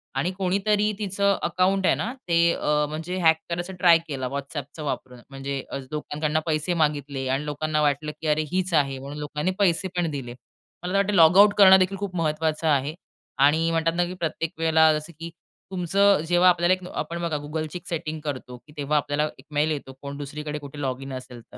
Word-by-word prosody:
आणि 150 +7 0
कोणीतरी 200 +3 +1
तिचं 200 -1 +1
अकाउंट 190 +1 +1
आहे - - +4
ना 235 +4 -3
ते 170 - +1 0.2
अ, 150 0 +1
म्हणजे 160 +4 -4
हॅक 160 -1 +5
करायचं 175 +2 -3
ट्राय 175 -3 +7
केलं 135 -4 -3
WhatsAppचा 140 +2 -6
वापरून, 130 -3 -5
म्हणजे 135 0 -4
अ, - - -3
लोकांकडून 150 0 -2
पैसे 155 +1 0
मागितले 145 -3 -2
आणि 135 +3 -1
लोकांना 150 +1 -1
वाटलं, 150 +1 0
की 160 - -3
अरे 150 0 +2
हीच 185 0 -1
आहे 140 -3 +2
म्हणून 140 +2 -8
लोकांनी 150 +4 -2
पैसे 190 -1 +2
पण 175 -2 +1
दिले. 130 -4 -5 0.5
मला 180 - -3
तर - - +3
वाटतं 200 +1 +1
लॉगआउट 190 +4 +7
करणं 190 -2 +9
देखील 190 +1 +1
खूप 195 -2 -5
महत्त्वाचं 160 -1 -1
आहे. 145 0 +1 0.4
आणि 155 +4 +4
म्हणतात 165 0 +1
ना, 175 0 +2
की 175 - -6
प्रत्येक 165 -2 -3
वेळेला 160 -1 +5
जसं 155 +3 -12
की 165 +1 -6 0.4
तुमचं 195 +1 +3
जेव्हा 175 +1 +5
आपल्याला 175 0 +3
एक 185 -1 -4
आपण 170 0 -4
बघा 165 -3 -1
Googleची 155 +2 -4
एक 175 - -14
सेटिंग 160 -2 -4
करतो. 130 -4 -6 0.2
तेव्हा 145 +1 0
आपल्याला 145 +1 0
एक 130 - -16
मेल 150 +2 +2
येतो 140 -3 -5
कोण 140 0 -6
दुसरीकडे 150 +1 -5
कुठे 145 0 -10
लॉगिन 135 0 -4
असेल 130 -2 -8
तर - - -10
155 Hz, 195 wpm, -25 LUFS, 145-180 Hz, 0.5 s, करणं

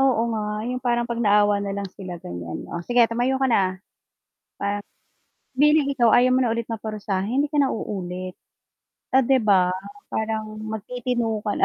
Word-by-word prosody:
Oo 265 -4 +3
nga, 210 0 -3
yung 250 +1 -3
parang 240 -1 +1
pag 235 0 -3
naawa 205 -1 +4
na 200 - -3
lang 200 - -3
sila 185 -3 -7
ganyan 85 - -7
o 170 - -5
sige 240 +6 +4
tumayo 240 +3 0
ka 265 - 0
na. 195 -7 +2
Parang - - -26 1.8
bilang 300 +1 +4
ikaw 260 -4 +3
ayaw 245 +1 +5
mo 255 - +3
na 230 - +1
ulit 230 0 -3
maparusa 210 -4 -3
hindi 265 +8 0
ka 300 - -4
na 275 - +3
uulit. 185 -3 -5 0.8
Ah, 265 - +6
'di 265 +2 +3
ba 190 -4 +4 0.4
parang 220 -1 -3
magtitino 225 +1 -2
ka 205 - +1
na. - - +4
220 Hz, 175 wpm, -24 LUFS, 200-245 Hz, 1.8 s, Ah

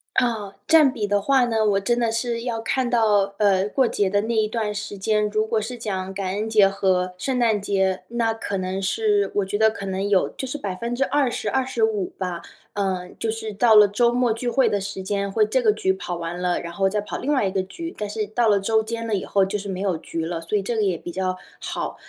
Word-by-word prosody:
啊， 230 -5 +1 0.2
占 305 -5 +5
比 220 -6 -2
的 205 0 +1
话 265 +4 +3
呢， 235 -2 0
我 195 - +2
真 240 +5 0
的 235 -1 +1
是 230 +1 -2
要 235 -2 -2
看 250 +2 0
到 210 -4 +2
呃， 200 -2 +3
过 260 +5 +2
节 205 -4 0
的 205 +1 +2
那 225 +2 -2
一 220 -1 +2
段 215 -1 -2
时 205 0 -5
间， 210 +1 +1
如 215 +1 0
果 220 0 0
是 235 +3 -5
讲 190 -4 -4
感 190 -1 -3
恩 215 +2 -2
节 210 -3 +5
和 185 -2 0
圣 255 +8 -2
诞 225 -4 +2
节， 190 -2 0
那 230 -1 0
可 220 -2 -4
能 185 0 -2
是 410 - +1
我 205 - +2
觉 200 +2 -2
得 220 +1 +5
可 200 -2 -7
能 190 +1 -2
有 200 -2 +2
就 265 - -6
是 260 - -4
20%-25% 235 -1 0
吧。 180 -3 -3 0.4
嗯， 185 -2 -2
就 225 - -1
是 220 -1 -5
到 225 +3 +4
了 210 -1 +8
周 235 +4 +2
末 245 -1 +2
聚 240 +2 -3
会 265 +2 +3
的 205 - 0
时 195 0 -5
间， 200 +1 -2
会 215 +1 +3
这 255 +5 +1
个 220 -3 +4
局 195 -3 0
跑 180 -2 -5
完 170 +1 -5
了， 180 -1 0
然 170 0 -7
后 195 +2 +1
再 210 +2 -1
跑 205 - -5
另 285 - -1
外 265 -7 +2
一 - - -2
个 190 -1 0
局。 330 - -7
但 210 -1 -4
是 210 0 -3
到 225 +2 +1
了 205 -1 +4
周 220 +2 +1
间 230 +1 -4
了 220 - 0
以 190 - -2
后， 195 -1 +2
就 195 +2 -2
是 200 0 -7
没 185 -1 -4
有 190 -4 0
局 165 0 -4
了， 165 0 -3
所 165 +6 -1
以 - - 0
这 235 +5 -3
个 220 - +1
也 190 -4 +1
比 175 - -8
较 185 +1 -2 0.2
好。 - - -4
210 Hz, 265 characters per minute, -23 LUFS, 195-230 Hz, 0.4 s, 了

